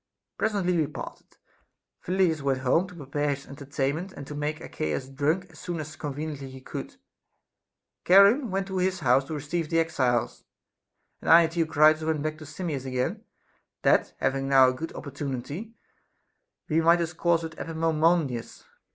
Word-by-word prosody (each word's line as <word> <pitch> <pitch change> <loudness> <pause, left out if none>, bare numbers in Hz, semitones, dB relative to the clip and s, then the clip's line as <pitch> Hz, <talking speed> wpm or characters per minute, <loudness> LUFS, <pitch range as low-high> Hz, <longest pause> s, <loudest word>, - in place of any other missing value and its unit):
Presently 200 -5 0
we 160 -3 +2
parted. - - -9 0.7
Phyl 185 +2 -2
lidas 165 -5 +2
went 135 -2 0
home 165 +8 +2
to 180 - -13
prepare 145 -1 -1
his 140 - -13
entertainment, 140 +5 -3
and 140 - -8
to 150 - -8
make 150 +1 -3
Archias 80 - -3
drunk 150 +7 0
as 160 - -15
soon 175 -2 -4
as 155 0 -7
conveniently 145 -2 -5
he 130 0 -10
could; 130 - -7 1.1
Charon 200 +8 +6
went 195 +1 -1
to 190 -1 -3
his 185 -1 0
house 130 0 +3
to 155 - -5
receive 150 +3 -3
the 165 - +1
exiles; 130 -8 0 0.8
and - - -4
I 170 +1 +9
and 165 0 -2
Theo 165 -2 +1
critus 155 0 +5
went 155 -2 -1
back 155 0 -3
to 155 - -10
Simmias 150 -3 -4
again, 130 0 -2 0.6
that - - +3
having 135 0 -1
now 135 -1 +7
a - - -1
good 160 +6 -6
opportunity, 140 - -6 0.9
we 160 +1 +2
might 165 +1 +6
discourse 170 0 0
with 160 0 -6
Epaminondas. 160 -5 0
155 Hz, 165 wpm, -27 LUFS, 140-170 Hz, 1.1 s, I